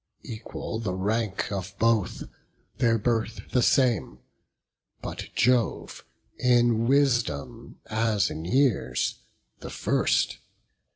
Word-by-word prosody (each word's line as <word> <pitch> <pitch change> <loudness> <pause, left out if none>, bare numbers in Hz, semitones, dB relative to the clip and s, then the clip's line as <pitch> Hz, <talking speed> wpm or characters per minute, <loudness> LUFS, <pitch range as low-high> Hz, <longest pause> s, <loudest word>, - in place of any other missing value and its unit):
Equal 110 0 -6
the 100 -5 -3
rank 105 +1 -1
of 100 -1 -4
both, 115 -3 +1 0.6
their 115 -1 +3
birth 115 0 -2
the 125 - +3
same, 120 - +2 0.8
But - - -6
Jove 125 -1 +1 0.4
in 120 -2 +3
wisdom, 120 - 0
as 110 -3 +1
in 80 - -5
years, 95 - +1 0.4
the - - -8
first. - - 0
115 Hz, 100 wpm, -26 LUFS, 100-120 Hz, 0.8 s, their